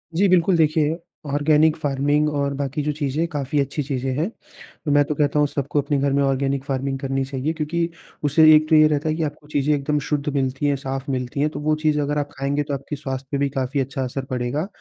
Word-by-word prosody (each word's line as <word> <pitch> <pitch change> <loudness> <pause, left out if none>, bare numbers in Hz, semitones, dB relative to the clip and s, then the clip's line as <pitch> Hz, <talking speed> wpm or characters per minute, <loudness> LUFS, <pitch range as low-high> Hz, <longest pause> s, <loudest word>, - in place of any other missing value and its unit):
जी। 200 +4 +4
बिल्कुल 180 0 +4
देखिए 155 0 +2 0.4
organic 150 +1 +4
farming 145 0 +1
और 140 0 0
बाकी 140 +2 -2
जो 150 - 0
चीज़ 145 -1 -3
हैं 165 - +1
काफ़ी 145 0 -1
अच्छी 140 +2 -1
चीज़ें 135 -1 -2
हैं। 165 +7 0 0.6
तो 145 - 0
मैं 145 0 +5
तो 150 - -2
कहता 145 0 +1
हूँ 145 - +4
सबको 145 +1 -1
अपने 145 +1 -1
घर 140 0 +1
में 140 - +2
ऑर्गेनिक 135 0 0
फार्मिंग 135 0 -2
करनी 135 -1 -1
चाहिए 135 +3 -2
क्योंकि 165 +2 -1 0.3
उससे 145 +2 +4
एक 155 0 +3
तो 160 - +5
ये 155 0 +7
रहता 150 +1 0
है 155 - 0
कि 160 - -1
आपको 150 0 -5
चीज़ें 150 0 +1
एकदम 145 +1 0
शुद्ध 145 -1 -1
मिलती 135 +1 -1
हैं 145 -1 +2
साफ़ 135 0 -5
मिलती 130 +2 -3
हैं 150 +2 +2
तो - - -7
वो 155 +1 +1
चीज़ 150 -1 +2
अगर 145 +1 -1
आप 145 0 -1
खाएँगे 140 +2 0
तो 145 0 -5
आपके 140 +2 -4
स्वास्थ्य 135 -2 -5
पे 140 - 0
भी 140 0 +1
काफ़ी 135 0 -2
अच्छा 135 0 -2
असर 130 +1 -4
पड़ेगा। 130 +7 -2
145 Hz, 240 wpm, -22 LUFS, 135-150 Hz, 0.6 s, ये